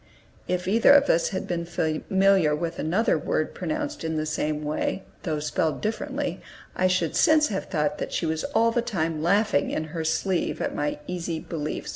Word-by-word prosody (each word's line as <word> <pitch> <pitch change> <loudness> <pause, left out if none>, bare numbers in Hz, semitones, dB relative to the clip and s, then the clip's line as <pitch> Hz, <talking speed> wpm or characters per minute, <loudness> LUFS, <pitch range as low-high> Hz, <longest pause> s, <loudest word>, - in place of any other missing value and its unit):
(If 180 0 -1
either 225 +7 +6
of 285 0 +5
us 165 - +2
had 190 - -4
been 170 -1 -2
familiar 170 +1 +2
with 165 +2 -4
another 185 +9 +1
word - - -1
pronounced 300 - -3
in 160 -1 -2
the 155 - -1
same 155 0 -2
way, 155 +5 -2 0.2
though 155 -3 -2
spelled 150 +1 -1
differently, 215 +1 -3 0.3
I 185 - +3
should 185 -3 0
since 310 -2 +4
have 195 -2 -3
thought 150 -4 -1
that - - -4
she - - -1
was 160 0 -1
all 230 -5 +2
the 240 - +1
time 165 -9 -2
laughing 185 -3 +2
in 155 - -2
her 165 -2 -2
sleeve 180 +3 0
at - - -2
my 145 0 -2
easy 170 -2 -3
belief.) 155 -2 -5
170 Hz, 185 wpm, -25 LUFS, 155-200 Hz, 0.3 s, either